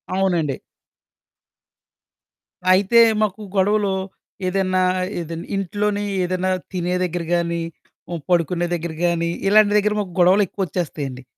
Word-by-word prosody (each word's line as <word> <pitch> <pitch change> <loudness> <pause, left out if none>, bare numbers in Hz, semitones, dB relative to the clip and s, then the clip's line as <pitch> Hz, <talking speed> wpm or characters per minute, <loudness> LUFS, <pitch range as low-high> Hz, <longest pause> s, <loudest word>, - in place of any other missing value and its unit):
అవునండి. 175 -8 0 2.2
అయితే, 200 +5 +4 0.2
మాకు 215 0 -1
గొడవలు 200 +1 +2 0.5
ఏదన్నా, 185 0 +1 0.4
ఏదన్ 165 0 -5
ఇంట్లోనే 205 +2 -1 0.2
ఏదన్నా 185 +1 -1 0.2
తినే 180 0 -1
దెగ్గర 175 -1 -2
గానీ, 170 -1 -1 0.5
హ్మ్, 170 -2 -4
పడుకునే 175 0 +1
దెగ్గర 170 -1 -3
గానీ, 170 -1 0 0.2
ఇలాంటి 210 0 +5
దెగ్గర 210 0 +1
మాకు 185 -4 -7
గొడవలెక్కువొచ్చేస్తాయండి. 175 -8 0
180 Hz, 100 wpm, -21 LUFS, 170-195 Hz, 2.2 s, ఇలాంటి